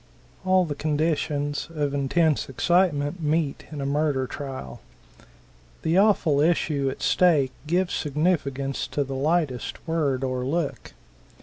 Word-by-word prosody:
All 185 -1 +3
the 150 - -3
conditions 145 -1 -1
of 145 -2 -1
intense 145 +2 +1
excitement 165 +2 +1
meet 155 -1 0
in 150 -2 -5
a - - -2
murder 140 -2 +1
trial. 130 - -7 1.0
The 165 +4 +3
awful 190 -8 +3
issue 150 -3 +1
at 130 - -7
stake 155 -8 +3 0.2
gives 180 +2 +1
significance 140 -3 -1
to 145 - -1
the 135 0 -6
lightest 145 -1 -1
word 145 -5 0
or 130 -1 -1
look. 150 +3 -3
145 Hz, 125 wpm, -25 LUFS, 140-165 Hz, 1.0 s, All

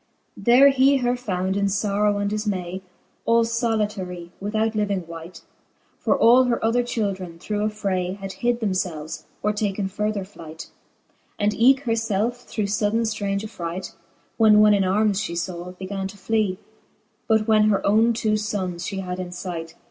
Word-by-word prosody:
XIX. - - -12
There 250 +4 +7
he 275 +1 +4
her 245 -1 +1
found 190 -6 -2
in 200 0 +1
Ibrrow 205 +1 +1
and 205 0 -1
difmay. 190 -4 -3 0.5
All 230 0 +5
iblitarie 210 -7 -2
without 215 +2 -1
living 200 -4 -1
wight; 165 +1 -10 0.6
For - - +1
all 250 +3 +6
her 235 -2 0
other 235 +2 +3
children, 195 -8 -3
through 210 +4 -3
affray, 190 -4 -2
Had 195 -1 -6
hid 240 -1 +1
thernfelves, 180 -6 -3 0.2
or 210 - +2
taken 205 -2 -1
further 210 0 -2
flight; 165 -5 -11 0.7
And 205 0 +1
eke 260 +5 +4
her 245 -5 -2
felfe 225 +2 -1
through 215 - -2
fuddcn 215 +2 0
Arrange 200 0 -1
affright, 180 -4 -6 0.4
When 215 -2 +6
one 210 0 +6
in 200 -1 +3
armes 205 +2 +2
fhe 170 -4 -2
law, 180 0 -7
began 190 +1 -5
to 195 - -11
fly; 205 -1 0 0.7
But 220 -1 +2
when 215 -1 +5
her 210 -2 +2
owne 220 +3 +4
two 215 -2 0
fonnes 190 -5 -3
fhe 195 -1 -4
had 180 0 -5
in 180 -1 -4
fight. 170 -2 -6
205 Hz, 165 wpm, -23 LUFS, 185-220 Hz, 0.7 s, There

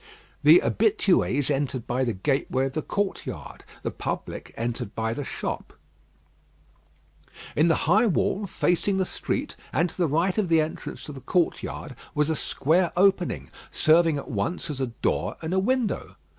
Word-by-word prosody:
The - - +7
habitués 180 - +2
entered 135 -3 -1
by 125 +2 0
the 120 - +1
gateway 135 +4 0
of 135 - -3
the 155 - -1
courtyard; 200 +5 -4 0.2
the - - -2
public - - -5
entered 115 -3 -3
by 110 0 -1
the 145 - -4
shop. - - -5 1.8
In 155 +3 +4
the 165 - +2
high 220 +3 +4
wall, 195 +1 0
facing 190 +1 +1
the 190 - +1
street, - - -3 0.2
and 165 +4 +1
to - - -15
the 175 -2 +2
right 170 +7 +1
of 195 -5 0
the 165 -1 +5
entrance 155 +1 -3
to - - -7
the 135 -2 -9
courtyard, 160 -3 -1 0.2
was 150 +1 +2
a - - +1
square 165 +5 +1
opening, 180 - +2 0.2
serving 160 -1 +4
at 140 - -6
once 155 - -2
as 135 -2 -5
a 130 - +1
door 115 - -1
and 160 +2 -3
a 190 - +3
window. 240 +1 0
160 Hz, 165 wpm, -26 LUFS, 135-185 Hz, 1.8 s, The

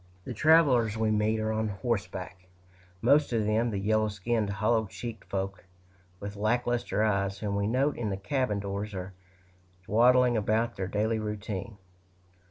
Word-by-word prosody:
The 130 - -5
travelers 130 -6 +4
we 110 -1 +1
meet 110 +1 +1
are 110 0 -1
on 110 0 0
horseback 100 -4 -4 0.6
most 140 +4 +4
of 110 -2 +1
them 110 +3 +1
the 105 - -3
yellow 110 +2 +1
skinned, 105 +1 -1
hollow 110 +2 +1
cheeked 115 +3 -7
folk, 95 -1 -3 0.6
with 100 0 -6
lack 110 +4 0
luster 120 -3 0
eyes, 100 -2 0
whom 100 -1 -3
we 100 0 0
note 135 +6 +1
in 115 -3 -2
the 95 - -2
cabin 125 0 -1
doors, 100 +1 -4
or 95 +1 -6 0.7
dawdling 125 +2 +4
about 110 +2 0
their 95 -1 -3
daily 110 +3 0
routine. 105 -1 -5
110 Hz, 160 wpm, -28 LUFS, 100-120 Hz, 0.7 s, travelers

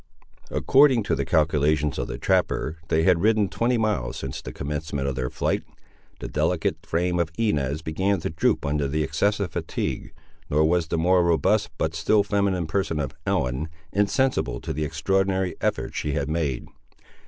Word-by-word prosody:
According 135 -4 +4
to - - 0
the - - -2
calculations 75 -1 +2
of - - -2
the - - -5
trapper, 80 +1 0
they 80 +1 +2
had 90 -1 +4
ridden 105 -2 +3
twenty 120 +1 +1
miles 105 - -1
since 65 -1 -5
the - - -7
commencement 75 -1 -3
of 70 - -1
their 65 -1 -2
flight. - - -1 0.6
The - - -4
delicate 80 - -1
frame 85 +2 0
of 85 -2 0
Inez 75 - 0
began 95 +5 0
to - - -3
droop 80 - +1
under 70 0 0
the 75 +3 0
excessive 100 +5 0
fatigue, - - -3 0.4
nor 75 +2 +3
was 85 -1 +1
the 85 - -1
more 90 +2 +4
robust, 95 +5 +2
but 80 - -1
still 90 +6 +3
feminine 100 -4 0
person 80 -1 -1
of 70 -2 -3
Ellen, 65 +5 0 0.2
insensible 105 - +1
to - - -4
the 75 +2 -2
extraordinary 95 +4 0
effort - - -1
she 75 - -2
had 70 -1 -1
made. 75 -6 -1
80 Hz, 170 wpm, -25 LUFS, 75-100 Hz, 0.6 s, According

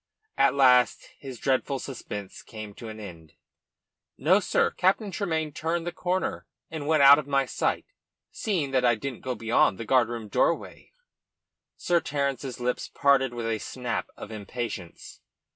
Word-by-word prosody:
At - - +3
last 125 -3 +4
his 130 -3 -8
dreadful 135 +2 0
suspense 105 -7 -7
came 110 -2 -9
to 115 +2 -9
an 110 0 -9
end. 85 -7 -11 0.8
"No, - - +4
sir. - - +1
Captain 195 +3 +1
Tremayne 160 -6 -2
turned 165 +3 -2
the 175 - -2
corner, 185 +2 -2 0.2
and 155 -3 -5
was 155 -2 +3
out 140 +1 +9
of 145 - -6
my 140 -1 +2
sight, 125 - -1 0.5
seeing 170 -10 -2
that 130 -1 +2
I 120 -1 +4
didn't 130 +2 -6
go 130 -1 -3
beyond 110 -3 +2
the 115 - -6
guardroom 120 -2 +1
doorway." - - -1 0.9
Sir 175 -1 +2
Terence's 140 -4 -3
lips 125 0 -2
parted 140 -2 +2
with 120 -1 -5
a 115 -1 -1
snap 125 0 -4
of 105 - -9
impatience. 110 -4 -7
130 Hz, 155 wpm, -27 LUFS, 115-145 Hz, 0.9 s, out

